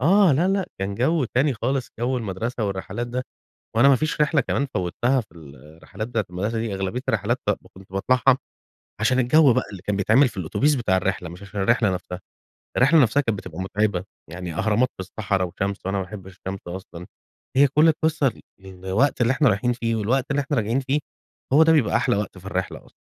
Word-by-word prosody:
آه، 185 Hz, +4 st, +5 dB
لأ 170 Hz, +8 st, +2 dB
لأ 195 Hz, -1 st, 0 dB
كان 95 Hz, +1 st, -3 dB
جَو 135 Hz, +6 st, +1 dB
تاني 130 Hz, +3 st, +1 dB
خالص، 130 Hz, +3 st, -2 dB
جَو 125 Hz, +2 st, 0 dB
المدرسة 110 Hz, +2 st, -3 dB
والّرِّحلات 100 Hz, +5 st, -3 dB
ده، 125 Hz, +1 st, -3 dB, 0.5 s
وأنا 120 Hz, +5 st, +6 dB
ما 135 Hz, -, +6 dB
فيش 155 Hz, +3 st, -2 dB
رحلة 150 Hz, 0 st, +3 dB
كمان 140 Hz, +2 st, -1 dB
فوتّها 120 Hz, +9 st, +1 dB
في 110 Hz, -, -14 dB
الرّحلات 80 Hz, -, -10 dB
بتاعة 110 Hz, -4 st, -1 dB
المدرسة 105 Hz, +6 st, -2 dB
دي، 110 Hz, -3 st, -2 dB
أغلبية 95 Hz, +5 st, -2 dB
الرّحلات -, -, +1 dB, 0.4 s
كنت 95 Hz, 0 st, -16 dB
باطلعها، 130 Hz, +6 st, +3 dB, 0.6 s
عشان 125 Hz, +3 st, +2 dB
الجَو 130 Hz, +1 st, +5 dB
بقى -, -, +1 dB
اللي 95 Hz, -3 st, -9 dB
كان 105 Hz, +1 st, -2 dB
بيتعمل 110 Hz, +8 st, +4 dB
في 105 Hz, -4 st, -11 dB
الأوتوبيس 135 Hz, -, +1 dB
بتاع 115 Hz, -7 st, +1 dB
الرِّحلة، 95 Hz, -2 st, -2 dB
مش 85 Hz, +3 st, -11 dB
عشان 100 Hz, 0 st, -5 dB
الرِّحلة 110 Hz, -2 st, +2 dB
نفسها، 90 Hz, 0 st, -6 dB, 0.6 s
الرحلة 145 Hz, +4 st, +5 dB
نفسها 125 Hz, +5 st, +3 dB
كانت 115 Hz, -7 st, -1 dB
بتبقى 90 Hz, -3 st, -9 dB
مُتعبة، 95 Hz, -1 st, -1 dB, 0.3 s
يعني 90 Hz, -1 st, -6 dB
أهرامات 110 Hz, +7 st, +2 dB
في -, -, -5 dB
الصَّحرا 95 Hz, 0 st, -2 dB
وشمس، 95 Hz, +3 st, -3 dB
وأنا 100 Hz, 0 st, -1 dB
ما 95 Hz, -, -2 dB
أحبِّش 95 Hz, -1 st, -10 dB
الشَّمس 95 Hz, 0 st, -6 dB
أصلًا، 90 Hz, -1 st, -8 dB, 0.5 s
هي 140 Hz, +1 st, +7 dB
كُلّ 150 Hz, +4 st, +4 dB
القصَّة 155 Hz, -4 st, +1 dB, 0.3 s
الوقت 95 Hz, +9 st, -1 dB
اللي 120 Hz, +1 st, +3 dB
إحنا 140 Hz, 0 st, +3 dB
رايحين 105 Hz, +4 st, +1 dB
فيه، 115 Hz, -1 st, -1 dB
والوقت 125 Hz, +6 st, 0 dB
اللي 140 Hz, +1 st, +1 dB
إحنا 140 Hz, +1 st, -2 dB
راجعين 115 Hz, +4 st, +1 dB
فيه، 135 Hz, +3 st, 0 dB, 0.5 s
هوَ 155 Hz, +3 st, +7 dB
ده 160 Hz, 0 st, +6 dB
بيبقى 140 Hz, -9 st, +3 dB
أحلى -, -, +1 dB
وقت 105 Hz, -2 st, -4 dB
في 90 Hz, -, -13 dB
الرِّحلة 95 Hz, -1 st, -4 dB
أصلًا. -, -, -22 dB
115 Hz, 200 wpm, -23 LUFS, 95-135 Hz, 0.6 s, هي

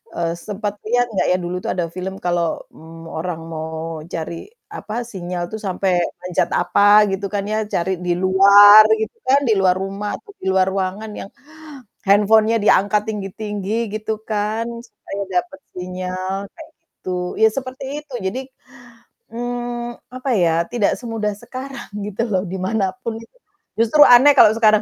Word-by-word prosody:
eee, 170 Hz, -1 st, -1 dB
sempet 205 Hz, 0 st, -3 dB
lihat 245 Hz, +1 st, +2 dB
nggak -, -, +1 dB
ya, 180 Hz, -, +3 dB
dulu 175 Hz, +1 st, -3 dB
tuh -, -, -2 dB
ada 175 Hz, -2 st, -1 dB
film 190 Hz, +1 st, -5 dB
kalau, 175 Hz, -1 st, +1 dB, 0.2 s
mmm, 165 Hz, +1 st, -13 dB
orang 165 Hz, 0 st, -4 dB
mau 160 Hz, 0 st, -5 dB
cari, 165 Hz, 0 st, -4 dB, 0.4 s
apa, 210 Hz, -, -7 dB, 0.2 s
sinyal 180 Hz, -2 st, -4 dB
tuh 220 Hz, -, -5 dB
sampai 190 Hz, 0 st, 0 dB, 0.3 s
manjat 180 Hz, -1 st, 0 dB
apa 190 Hz, -, +1 dB, 0.3 s
gitu 195 Hz, +1 st, -3 dB
kan 200 Hz, -, -1 dB
ya, 215 Hz, -, 0 dB, 0.2 s
cari 175 Hz, +2 st, 0 dB
di 175 Hz, -, 0 dB
luar 200 Hz, +3 st, +8 dB, 0.2 s
gitu 220 Hz, -, -4 dB
kan, 275 Hz, +2 st, +5 dB
di -, -, +3 dB
luar 185 Hz, -1 st, +3 dB
rumah, 200 Hz, +2 st, -4 dB
atau 415 Hz, -, -14 dB
di -, -, -9 dB
luar 190 Hz, 0 st, +3 dB
ruangan 195 Hz, +3 st, -3 dB
yang 195 Hz, -, -8 dB, 0.8 s
handphone-nya 215 Hz, +3 st, +4 dB
diangkat 205 Hz, 0 st, +3 dB
tinggi-tinggi 205 Hz, 0 st, -4 dB, 0.2 s
gitu 215 Hz, 0 st, -3 dB, 0.2 s
kan, 215 Hz, +1 st, -1 dB, 0.2 s
supaya 200 Hz, -2 st, -7 dB, 0.2 s
dapat 285 Hz, +5 st, -15 dB, 0.2 s
sinyal, 185 Hz, +1 st, -4 dB, 0.2 s
kayak 325 Hz, -2 st, -12 dB, 0.2 s
gitu, 185 Hz, -, -8 dB, 0.3 s
ya 220 Hz, -, +8 dB
seperti 260 Hz, +2 st, -6 dB, 0.2 s
itu. 280 Hz, -4 st, -14 dB
Jadi, 205 Hz, +8 st, -2 dB, 0.9 s
mmm, 240 Hz, 0 st, -4 dB, 0.2 s
apa 255 Hz, +1 st, -4 dB
ya, 170 Hz, -3 st, +3 dB, 0.2 s
tidak 225 Hz, -4 st, +1 dB
semudah 225 Hz, -4 st, -3 dB
sekarang, 270 Hz, +1 st, -8 dB, 0.2 s
gitu 210 Hz, +2 st, -4 dB
loh, 185 Hz, -2 st, +1 dB
di 190 Hz, -, -3 dB
manapun 195 Hz, +2 st, -2 dB
itu, 230 Hz, -, -18 dB, 0.4 s
justru 230 Hz, +7 st, +3 dB
aneh 280 Hz, +4 st, +7 dB
kalau -, -, +8 dB
sekarang 215 Hz, -2 st, +4 dB
205 Hz, 155 wpm, -20 LUFS, 185-225 Hz, 0.9 s, luar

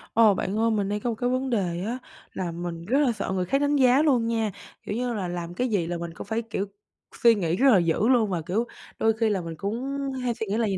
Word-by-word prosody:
Ờ, 220 Hz, -2 st, +6 dB
bạn 190 Hz, +2 st, -2 dB
ơi, 230 Hz, 0 st, +3 dB
mình 205 Hz, -2 st, 0 dB
đang 210 Hz, -, -1 dB
có 240 Hz, -, -2 dB
một 230 Hz, -, -1 dB
cái 245 Hz, +2 st, -1 dB
vấn 260 Hz, +1 st, 0 dB
đề 180 Hz, -7 st, -1 dB
á 235 Hz, +3 st, -2 dB, 0.4 s
là 180 Hz, -3 st, -3 dB
mình 170 Hz, 0 st, -5 dB
rất 255 Hz, +9 st, +2 dB
là 280 Hz, -4 st, +3 dB
sợ 210 Hz, -4 st, -3 dB
người 185 Hz, -1 st, 0 dB
khác 275 Hz, +10 st, +1 dB
đánh 290 Hz, 0 st, +2 dB
giá 260 Hz, 0 st, +5 dB
luôn 265 Hz, -7 st, +3 dB
nha. 225 Hz, -2 st, 0 dB, 0.3 s
Kiểu 210 Hz, -, -4 dB
như 245 Hz, +1 st, -1 dB
là 200 Hz, -5 st, -2 dB
làm 175 Hz, -1 st, -5 dB
cái 250 Hz, +8 st, 0 dB
gì 190 Hz, -7 st, 0 dB
là 175 Hz, 0 st, -2 dB
mình 170 Hz, 0 st, -6 dB
cũng 170 Hz, -, -9 dB
phải, 220 Hz, +2 st, -1 dB
kiểu, 215 Hz, -3 st, -3 dB, 0.6 s
suy 235 Hz, -1 st, +7 dB
nghĩ 170 Hz, -5 st, 0 dB
rất 270 Hz, +8 st, +4 dB
là 210 Hz, -, +7 dB
dữ 170 Hz, +5 st, +1 dB
luôn, 240 Hz, -5 st, +4 dB
và, 175 Hz, -3 st, -1 dB
kiểu, 195 Hz, +9 st, -1 dB, 0.3 s
đôi 225 Hz, 0 st, +3 dB
khi 220 Hz, 0 st, +1 dB
là 200 Hz, -3 st, 0 dB
mình 165 Hz, -1 st, -6 dB
cũng 240 Hz, -, -3 dB, 0.3 s
hay 245 Hz, -1 st, +1 dB
suy 225 Hz, -, -4 dB
nghĩ 200 Hz, +2 st, -1 dB
là -, -, 0 dB
vầy 195 Hz, -3 st, 0 dB
215 Hz, 285 wpm, -26 LUFS, 180-240 Hz, 0.6 s, suy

